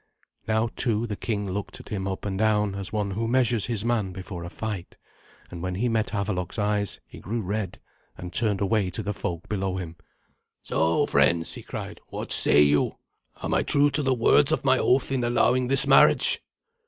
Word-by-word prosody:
Now, 110 Hz, +1 st, +1 dB
too, 115 Hz, -1 st, +1 dB
the 105 Hz, -3 st, -4 dB
king 105 Hz, -1 st, -3 dB
looked 100 Hz, +1 st, -5 dB
at -, -, -12 dB
him 95 Hz, -2 st, -3 dB
up 95 Hz, +1 st, -4 dB
and 100 Hz, -2 st, -2 dB
down, 105 Hz, -1 st, +2 dB
as 100 Hz, -2 st, -4 dB
one 105 Hz, -2 st, -1 dB
who 115 Hz, +4 st, -2 dB
measures 120 Hz, -3 st, +2 dB
his 115 Hz, -3 st, -2 dB
man 110 Hz, -6 st, 0 dB
before 95 Hz, -2 st, -7 dB
a 85 Hz, -, -6 dB
fight. 105 Hz, -3 st, -6 dB, 0.5 s
And 85 Hz, -1 st, -7 dB
when 90 Hz, 0 st, -3 dB
he 120 Hz, +6 st, 0 dB
met 115 Hz, -1 st, 0 dB
Havelok's 100 Hz, -3 st, -2 dB
eyes 105 Hz, -1 st, 0 dB
he -, -, -13 dB
grew 115 Hz, +2 st, -3 dB
red, 100 Hz, -1 st, -3 dB, 0.4 s
and 90 Hz, 0 st, -8 dB
turned 105 Hz, -3 st, +1 dB
away 100 Hz, -1 st, +1 dB
to 90 Hz, -, -4 dB
the 105 Hz, -, -2 dB
folk 85 Hz, -3 st, -5 dB
below 95 Hz, -2 st, -2 dB
him. 85 Hz, -3 st, -6 dB, 0.7 s
"So, 80 Hz, +1 st, +1 dB
friends," 85 Hz, -1 st, +2 dB
he -, -, -8 dB
cried, -, -, -7 dB
"what -, -, -6 dB
say 75 Hz, -, +5 dB
you? 75 Hz, 0 st, +2 dB, 0.5 s
Am -, -, -1 dB
I -, -, +3 dB
true 145 Hz, 0 st, +3 dB
to 145 Hz, +2 st, +1 dB
the 135 Hz, -2 st, +1 dB
words 135 Hz, +5 st, +4 dB
of 155 Hz, -, 0 dB
my 130 Hz, -1 st, +4 dB
oath 130 Hz, +1 st, +2 dB
in 130 Hz, -2 st, 0 dB
allowing 125 Hz, +1 st, +2 dB
this 135 Hz, +1 st, +2 dB
marriage?" -, -, +5 dB
105 Hz, 200 wpm, -25 LUFS, 95-115 Hz, 0.7 s, say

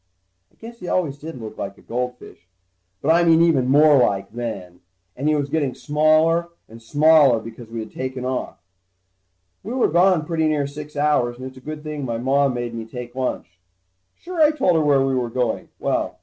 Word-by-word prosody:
I -, -, -31 dB
guess 235 Hz, +1 st, -12 dB
he 180 Hz, -, -8 dB
always 150 Hz, -7 st, -1 dB
did 155 Hz, -3 st, -8 dB
look 110 Hz, -2 st, -9 dB
like 100 Hz, 0 st, -5 dB
a -, -, -19 dB
goldfish, 125 Hz, -7 st, -6 dB, 0.6 s
but 155 Hz, -, +3 dB
I 170 Hz, +1 st, +4 dB
mean 165 Hz, -1 st, +5 dB
even 140 Hz, -7 st, +3 dB
more 145 Hz, 0 st, +5 dB
like, 100 Hz, -3 st, 0 dB
then. 100 Hz, -7 st, -6 dB, 0.4 s
And 145 Hz, +4 st, -1 dB
he 155 Hz, -, +3 dB
was 145 Hz, -1 st, -1 dB
getting 140 Hz, -6 st, -1 dB
smaller 155 Hz, +4 st, +2 dB, 0.2 s
and 115 Hz, +1 st, -14 dB
smaller, 145 Hz, 0 st, +4 dB
because 115 Hz, +1 st, -11 dB
we 115 Hz, 0 st, -5 dB
had 110 Hz, -, -9 dB
taken 130 Hz, -1 st, -5 dB
off. 130 Hz, -6 st, -3 dB, 1.0 s
We 220 Hz, -, -6 dB
were 260 Hz, -, +2 dB
gone 175 Hz, -1 st, +3 dB
pretty 160 Hz, -1 st, 0 dB
near 150 Hz, -2 st, 0 dB
six 150 Hz, +1 st, -9 dB
hours, 145 Hz, -5 st, +1 dB
and 130 Hz, -, -8 dB
it's 130 Hz, 0 st, -9 dB
a -, -, -12 dB
good 155 Hz, +2 st, -7 dB
thing 150 Hz, -2 st, -5 dB
my 120 Hz, -3 st, -3 dB
Mom 135 Hz, +2 st, +1 dB
made 120 Hz, -1 st, -4 dB
me 115 Hz, -1 st, -5 dB
take 120 Hz, +1 st, -8 dB
a 130 Hz, -, -7 dB
lunch. 90 Hz, -8 st, -4 dB, 0.6 s
Sure, 350 Hz, -1 st, -5 dB
I 305 Hz, -, +7 dB
told 275 Hz, -, +1 dB
her 160 Hz, -, +3 dB
where 140 Hz, -3 st, +3 dB
we 135 Hz, -, 0 dB
were 125 Hz, -2 st, -1 dB
going. 120 Hz, -1 st, -2 dB
Well -, -, -2 dB
140 Hz, 205 wpm, -21 LUFS, 120-155 Hz, 1.0 s, I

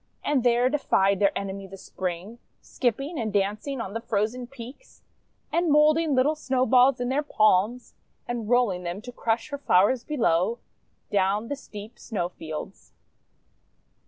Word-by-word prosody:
And 285 Hz, -4 st, +1 dB
there 245 Hz, 0 st, +3 dB
defied 200 Hz, -8 st, +2 dB
their 200 Hz, -, +2 dB
enemy, 195 Hz, 0 st, -5 dB
the 195 Hz, +1 st, -10 dB
Spring; 185 Hz, +5 st, -5 dB, 0.2 s
Skipping 275 Hz, +6 st, -2 dB
and 220 Hz, -2 st, -2 dB
dancing 210 Hz, +7 st, -1 dB
on 200 Hz, -4 st, -5 dB
the 230 Hz, -, -3 dB
frozen 230 Hz, +2 st, -2 dB
peaks, 255 Hz, -, -12 dB, 0.5 s
And 340 Hz, 0 st, +2 dB
moulding 305 Hz, 0 st, +4 dB
little 260 Hz, +4 st, +3 dB
Snowballs 260 Hz, -2 st, +3 dB
in 245 Hz, 0 st, -2 dB
their 275 Hz, +3 st, +1 dB
palms, 215 Hz, -3 st, +1 dB, 0.3 s
And 235 Hz, -3 st, -4 dB
rolling 240 Hz, -7 st, +2 dB
them 180 Hz, +4 st, -5 dB
to 245 Hz, -, -8 dB
crush 230 Hz, +2 st, -1 dB
her 285 Hz, -1 st, -5 dB
flowers 230 Hz, +1 st, +3 dB
below, 230 Hz, -, +1 dB, 0.5 s
Down 205 Hz, +2 st, +1 dB
the 285 Hz, -, -1 dB
steep 220 Hz, -4 st, -11 dB
Snowfields. 175 Hz, -4 st, -6 dB
235 Hz, 140 wpm, -26 LUFS, 200-265 Hz, 0.5 s, moulding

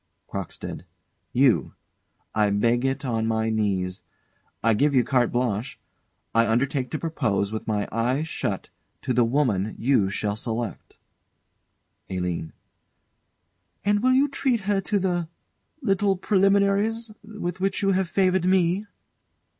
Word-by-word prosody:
CROCKSTEAD. -, -, -6 dB, 0.5 s
You. 130 Hz, -1 st, +3 dB, 0.6 s
I 105 Hz, -1 st, +3 dB
beg 115 Hz, +5 st, +2 dB
it 135 Hz, +1 st, -1 dB
on 115 Hz, -3 st, 0 dB
my 110 Hz, 0 st, 0 dB
knees. 95 Hz, -4 st, -1 dB, 0.6 s
I 115 Hz, 0 st, +4 dB
give 140 Hz, +6 st, +2 dB
you 125 Hz, -, +5 dB
carte 125 Hz, -2 st, +2 dB
blanche. 120 Hz, -1 st, -1 dB, 0.5 s
I 115 Hz, 0 st, +4 dB
undertake 130 Hz, +3 st, 0 dB
to 155 Hz, -, -2 dB
propose, 105 Hz, -12 st, -1 dB
with 110 Hz, -, -5 dB
my 105 Hz, -2 st, 0 dB
eyes 125 Hz, +7 st, 0 dB
shut, -, -, -3 dB, 0.3 s
to 130 Hz, -, 0 dB
the 120 Hz, 0 st, +4 dB
woman 115 Hz, -5 st, +1 dB
you 115 Hz, -6 st, +2 dB
shall 105 Hz, +1 st, -1 dB
select. 115 Hz, -2 st, -4 dB, 1.1 s
ALINE. 90 Hz, -3 st, -3 dB, 1.3 s
And 205 Hz, 0 st, +3 dB
will 255 Hz, +2 st, +4 dB
you 270 Hz, +2 st, +4 dB
treat 260 Hz, -4 st, 0 dB
her 195 Hz, 0 st, +1 dB
to 205 Hz, +2 st, 0 dB
the 175 Hz, -4 st, -1 dB, 0.5 s
little 195 Hz, -2 st, +2 dB
preliminaries 200 Hz, +4 st, +2 dB
with 205 Hz, -5 st, -5 dB
which 195 Hz, +2 st, 0 dB
you 195 Hz, -, +3 dB
have 190 Hz, -2 st, +1 dB
favoured 185 Hz, -1 st, +2 dB
me? 185 Hz, +2 st, +2 dB
135 Hz, 130 wpm, -25 LUFS, -, 1.3 s, you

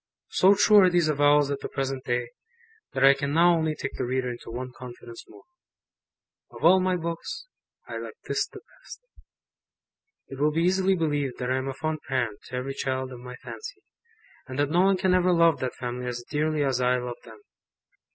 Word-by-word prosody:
So 195 Hz, +2 st, +5 dB
true 210 Hz, +1 st, +5 dB
are 185 Hz, -2 st, +6 dB
these 175 Hz, -3 st, +2 dB
avowals 145 Hz, -1 st, +3 dB
at 140 Hz, -, -2 dB
the -, -, -6 dB
present 135 Hz, -1 st, -3 dB
day, 120 Hz, -1 st, -1 dB, 0.6 s
that 130 Hz, -, 0 dB
I 135 Hz, -, +8 dB
can 140 Hz, +1 st, -3 dB
now 175 Hz, +1 st, +6 dB
only 160 Hz, -1 st, 0 dB
take 140 Hz, -, -5 dB
the -, -, 0 dB
reader 125 Hz, 0 st, -1 dB
into 120 Hz, -, -9 dB
one 125 Hz, +2 st, -5 dB
confidence 120 Hz, -2 st, -10 dB
more. 400 Hz, -, -16 dB, 1.1 s
Of -, -, -6 dB
all 185 Hz, +3 st, +7 dB
my 185 Hz, 0 st, +1 dB
books, 170 Hz, -, -5 dB, 0.4 s
I -, -, -5 dB
like -, -, -8 dB
this -, -, -1 dB
the -, -, -12 dB, 0.2 s
best. -, -, -11 dB, 1.3 s
It 135 Hz, -, -8 dB
will 150 Hz, +1 st, +3 dB
be 165 Hz, +2 st, +1 dB
easily 190 Hz, +1 st, +3 dB
believed 145 Hz, -6 st, -1 dB
that 125 Hz, 0 st, -2 dB
I 130 Hz, -, +1 dB
am 130 Hz, +1 st, -3 dB
a 135 Hz, -, -4 dB
fond 155 Hz, +1 st, -3 dB
parent 125 Hz, -5 st, -1 dB
to 125 Hz, -, -8 dB
every 130 Hz, +2 st, -3 dB
child 130 Hz, -1 st, -3 dB
of 125 Hz, -, -9 dB
my 125 Hz, 0 st, -9 dB
fancy, 445 Hz, +3 st, -9 dB, 0.6 s
and 130 Hz, -1 st, -7 dB
that 145 Hz, 0 st, +1 dB
no 175 Hz, +2 st, +4 dB
one 195 Hz, 0 st, +4 dB
can 185 Hz, 0 st, +2 dB
ever 185 Hz, 0 st, +3 dB
love 170 Hz, -2 st, +4 dB
that 130 Hz, -1 st, -3 dB
family 125 Hz, 0 st, -5 dB
as 120 Hz, -1 st, -5 dB
dearly 155 Hz, 0 st, 0 dB
as 130 Hz, -2 st, 0 dB
I 125 Hz, 0 st, +3 dB
love 125 Hz, -1 st, -5 dB
them. -, -, -14 dB
140 Hz, 205 wpm, -26 LUFS, 125-170 Hz, 1.3 s, I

